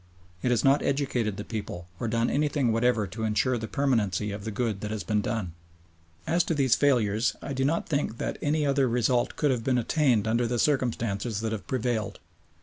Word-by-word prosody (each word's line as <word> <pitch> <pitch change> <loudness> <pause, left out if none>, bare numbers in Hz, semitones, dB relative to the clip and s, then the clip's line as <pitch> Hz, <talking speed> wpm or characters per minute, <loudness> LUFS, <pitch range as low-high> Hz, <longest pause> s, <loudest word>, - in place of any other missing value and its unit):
It - - 0
has 120 -2 +2
not 140 +1 +4
educated 125 -7 -1
the 105 - -4
people, 100 -6 -6
or 120 - -2
done 115 +1 +1
anything 145 -4 +1
whatever 115 -1 +2
to 110 +4 -6
ensure 115 +3 +1
the 110 - -5
permanency 110 -8 0
of 100 0 -6
the - - -2
good 110 -2 -2
that 105 - -4
has 110 -2 -3
been 105 +2 0
done. 105 -6 -2 0.7
As 170 +2 +2
to 165 - 0
these 135 -4 +3
failures, 120 -5 +2
I 140 - -5
do 135 0 -1
not 160 +5 0
think 140 -7 -1
that - - -3
any 150 +1 +1
other 135 -2 +2
result 120 +1 +1
could 145 -3 +2
have 120 -3 -1
been 130 0 +1
attained 120 -3 +2
under 115 +2 +1
the 120 +1 -1
circumstances 115 -5 0
that 110 -1 -2
have 110 -3 -5
prevailed. 120 -3 -2
120 Hz, 205 wpm, -27 LUFS, 110-135 Hz, 0.7 s, not